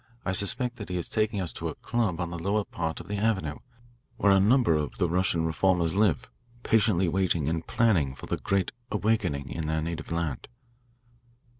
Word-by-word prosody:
I 90 - 0
suspect 120 +6 +1
that 105 - -7
he 90 - -2
is 85 - -2
taking 110 -1 0
us 90 -3 -2
to - - -4
a - - -6
club 110 -8 -1
on 85 0 -2
the 85 - -5
lower 100 +5 0
part 80 -4 -4
of - - -10
the 105 +1 -3
avenue, 95 -8 0 0.6
where 100 - +4
a 95 - +6
number 110 -1 +4
of 75 -2 -2
the 90 - +2
Russian 85 -1 +1
reformers 85 0 +2
live, 100 -7 +2 0.4
patiently 105 -5 +3
waiting 85 -4 +1
and 80 +1 -2
planning 85 - +2
for - - -9
the - - -2
great 100 -1 0 0.2
'awakening' 100 -11 0
in 80 -2 -3
their 80 0 0
native 85 0 -5
land." 85 -5 -2
90 Hz, 190 wpm, -27 LUFS, 80-105 Hz, 0.6 s, a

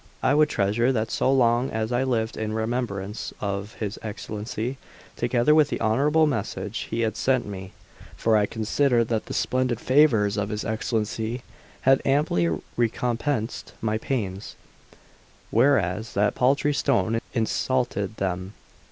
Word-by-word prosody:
I 135 - +4
would 150 +1 +4
treasure 110 +5 +1
that 110 -3 -1
so 130 - +2
long 120 -1 +3
as 110 +1 -2
I 120 +1 +1
lived 120 -4 0
in 110 -1 -3
remembrance 110 -3 -3
of 100 +1 -4
his 105 -1 -4
Excellency, 110 +3 -5 0.4
together 120 +4 +2
with 155 -2 +5
the - - -2
honourable 145 +8 +3
message 105 -6 -3
he 115 - -1
had 110 -2 0
sent 130 -2 +1
me; 95 -2 -7 0.5
for 115 -1 +2
I 105 -1 +3
considered 115 +1 +1
that 110 -2 -1
the - - -5
splendid 130 -2 0
favours 115 -7 +3
of 105 0 -1
his 105 0 -3
Excellency 110 +2 -2 0.4
had 135 0 +4
amply 135 - +2 0.3
recompensed 120 +1 -1
my 110 0 -1
pains, 105 -7 -3 1.0
whereas 110 -4 +2
that 105 +1 +2
paltry 140 +3 +2
stone 115 -3 +1
insulted 115 -2 0
them. 95 0 -3
115 Hz, 140 wpm, -25 LUFS, 105-130 Hz, 1.0 s, with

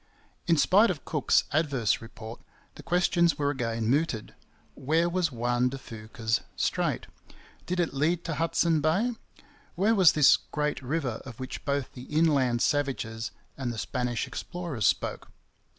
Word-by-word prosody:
In 165 -2 +4
spite 205 +9 +5
of 175 -6 -4
Cook's 150 -4 +2
adverse 140 -9 +1
report, 115 0 -10 0.3
the - - -11
questions 175 -1 +2
were 145 -1 +1
again 115 -4 -2
mooted: 135 -3 0 0.4
Where 160 +5 +1
was 175 -2 0
Juan 120 +1 +1
de 135 - -6
Fuca's 115 -1 -3
strait? - - -1 0.6
Did 180 0 -1
it 170 -4 0
lead 160 +5 +1
to 165 - -3
Hudson 165 0 +1
Bay? 195 +11 +1 0.6
Where 200 +6 +3
was 190 -6 +6
this 150 -3 +6
Great 150 -1 -3
River 130 -2 -2
of 120 -4 -10
which 130 0 -6
both 140 -1 -1
the 125 0 -9
inland 140 -7 +2
savages 125 -6 -1 0.3
and 130 -3 -3
the 115 - -6
Spanish 125 0 -2
explorers 170 - -3
spoke? - - -1
145 Hz, 150 wpm, -28 LUFS, 120-165 Hz, 0.6 s, was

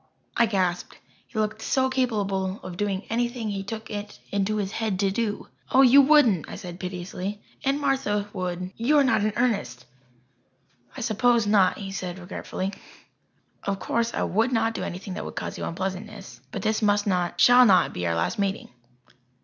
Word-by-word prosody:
I 235 - +4
gasped. 185 -4 -1 0.3
He 235 - -10
looked 215 0 -1
so 260 +3 +1
capable 205 -7 -1
of 185 -1 -7
doing 200 0 -2
anything 240 -1 -1
he 200 -1 -3
took 220 +2 -7
it 205 0 -6
into 200 +1 0
his 200 -2 -2
head 220 -5 -2
to 195 -1 +2
do. 210 0 -2 0.2
"Oh, 265 - +6
you 270 +2 +8
wouldn't," 265 - +4
I - - -6
said 180 -3 -8
piteously. 185 +2 -5 0.2
"Aunt 275 +1 +1
Martha 265 -8 0
would 180 -1 -4
you 265 +7 +3
are 285 - +6
not 265 -6 +2
in 215 - +1
earnest." 200 - -1 1.1
"I - - -5
suppose 235 0 +2
not," 200 -3 +3
he 195 -2 -6
said 185 -2 -5
regretfully. 190 +1 -5 0.9
"Of 200 -1 -2
course 235 +4 -1
I - - -1
would 225 +6 +1
not 225 -1 +1
do - - -4
anything 185 +2 -5
that 210 - -5
would - - -7
cause - - -5
you - - -3
unpleasantness. 195 +3 -5
But 195 - -5
this 220 +1 +1
must 205 -1 +2
not 180 -3 0
shall 245 +1 +8
not 190 -3 +4
be 90 -1 -2
our 85 - 0
last 145 - -1
meeting." 200 -1 -1
205 Hz, 180 wpm, -25 LUFS, 190-230 Hz, 1.1 s, you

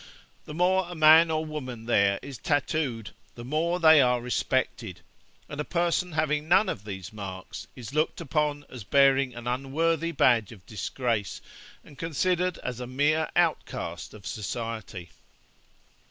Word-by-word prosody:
The 150 - -8
more 185 +1 +2
a 175 - -7
man 160 +1 +7
or 160 0 -1
woman 130 -7 -6
there 100 -4 +3
is 140 -3 -8
tattooed, 140 -7 -1 0.2
the 120 - -9
more 165 +6 0
they 160 -3 +7
are 125 -1 +3
respected; 120 -4 -2 0.5
and 145 +1 -5
a - - -2
person 175 +1 0
having 150 -1 0
none 190 +5 +4
of 100 - -5
these 95 -1 -7
marks 100 0 -8
is 125 0 -9
looked 155 +2 0
upon 145 0 -1
as 125 -5 -9
bearing 135 +2 +3
an 120 0 -8
unworthy 155 +7 0
badge 120 - +3
of 100 -5 -14
disgrace, 110 0 -3 0.4
and 140 - -16
considered 180 +2 0
as 125 -1 -4
a 125 - -5
mere 150 +5 +1
outcast 170 -9 -1
of 100 -2 -14
society.' 110 -4 -5
135 Hz, 150 wpm, -27 LUFS, 115-160 Hz, 0.5 s, man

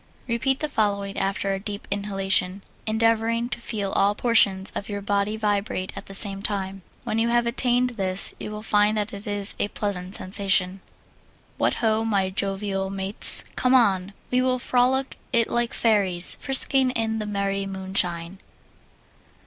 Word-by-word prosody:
Repeat 260 +4 -1
the 305 - -1
following, 200 -6 -2
after 195 0 -2
a 195 - -3
deep 205 +1 -7
inhalation, 195 -1 0 0.2
endeavoring 230 +1 0
to 245 - -5
feel 205 -4 -4
all 200 +1 +1
portions 200 -5 +2
of 200 - -6
your 205 -1 -4
body 200 +1 -1
vibrate 205 -3 -2
at - - -9
the 195 - -3
same 195 -1 +7
time. 195 -2 -3 0.2
When 220 - -2
you 230 +1 +1
have 240 0 +1
attained 245 +1 +1
this 190 -4 0
you - - -6
will 210 0 -8
find 210 0 +2
that 210 +1 -3
it 200 +1 -8
is 205 -1 -2
a - - 0
pleasant 200 -2 -4
sensation. 190 -1 0 0.8
What - - +1
ho, 220 -1 0
my 200 -4 0
jovial 195 0 -3
mates. 195 +1 +5
Come 255 +1 +2
on! 195 -5 +2 0.2
We 250 0 +2
will 255 0 0
frolic 255 +2 0
it 230 -1 +1
like 240 0 0
fairies, 195 -6 +1
frisking 270 -1 +4
in 225 -2 -1
the 215 - -4
merry 200 -1 -2
moonshine. 190 -2 -2
205 Hz, 160 wpm, -23 LUFS, 195-230 Hz, 0.8 s, same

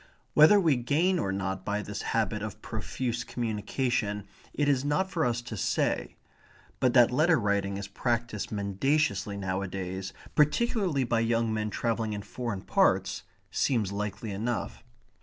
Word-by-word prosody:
Whether 155 +7 +7
we 160 -8 +3
gain 160 +9 +2
or 95 - -1
not 95 -1 -3
by 105 +1 -2
this 105 0 -5
habit 110 -2 0
of 105 -2 -5
profuse 120 +2 -3
communication 110 -2 -2 0.2
it 145 - 0
is 135 -2 +2
not 150 +7 0
for 165 - 0
us 120 -2 0
to 120 -2 -6
say. 100 - 0 0.6
But 125 -1 +2
that 120 -2 +7
letter 155 +5 +4
writing 100 -2 0
is 100 0 -5
practised 115 0 -2
mendaciously 100 +1 0
nowadays, 95 -1 -3 0.2
particularly 170 - +2
by 115 -1 +1
young 115 -1 +1
men 105 0 -1
travelling 115 0 -1
in 105 -1 -4
foreign 115 -6 -4
parts, - - +2 0.3
seems 110 -7 +1
likely 105 +1 -4
enough. 110 +4 -3
115 Hz, 145 wpm, -29 LUFS, 100-130 Hz, 0.6 s, Whether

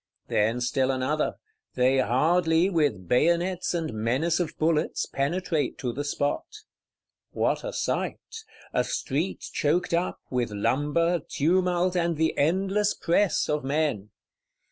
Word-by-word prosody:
Then 115 +4 +1
still 130 +2 +1
another; 135 +4 0 0.4
they 130 +1 +3
hardly, 160 +8 +2
with 145 - 0
bayonets 170 - +1
and 160 -6 -2
menace 130 +11 0
of 175 -3 -3
bullets, 155 -1 +1
penetrate 155 +2 -1
to 125 -2 -3
the 145 - -3
spot. 145 0 -1 0.9
What - - 0
a - - -4
sight! 450 -2 -3 0.3
A - - +2
street 155 +8 -2
choked 170 +4 +1
up, 175 +2 0
with 125 -2 0
lumber, 150 +11 +1
tumult 180 +3 +1
and 170 -2 0
the 160 +1 +1
endless 195 +7 +1
press 175 +1 +1
of 150 -1 -1
men. 140 -7 -1
155 Hz, 125 wpm, -26 LUFS, 130-175 Hz, 0.9 s, they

